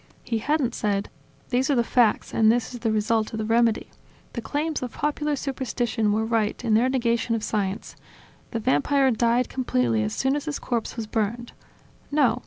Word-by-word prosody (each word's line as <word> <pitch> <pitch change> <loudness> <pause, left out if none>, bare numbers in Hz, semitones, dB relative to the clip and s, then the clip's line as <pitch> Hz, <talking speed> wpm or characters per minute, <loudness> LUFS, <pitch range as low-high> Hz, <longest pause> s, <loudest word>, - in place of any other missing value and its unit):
He 230 -2 -1
hadn't 280 0 0
said: 200 -1 -1 0.4
"These 255 +4 +1
are 285 - +3
the 240 - +3
facts, 235 -2 +2
and 220 -1 +5
this 235 -1 0
the 235 -2 -2
result 220 +1 0
of - - -3
the 220 - -2
remedy: 230 0 +2 0.4
the 235 - -4
claims 300 +5 -2
of 250 -2 -5
popular 295 0 -1
superstition 250 -5 -1
were 220 +2 +1
right 225 +1 -1
in 225 - +2
their 235 +4 +4
negation 235 -2 +1
of 220 - -3
science: 200 -2 -2 0.5
the - - -3
Vampire 260 - +2
died 235 +2 +2
completely 125 - 0
as 105 0 -2
soon 265 +1 +1
as 295 - -3
his 300 -2 -2
corpse 235 -3 -3
was 225 -2 -4
burned." 225 +2 -2 0.6
No. 290 -4 +2
235 Hz, 185 wpm, -25 LUFS, 220-260 Hz, 0.6 s, and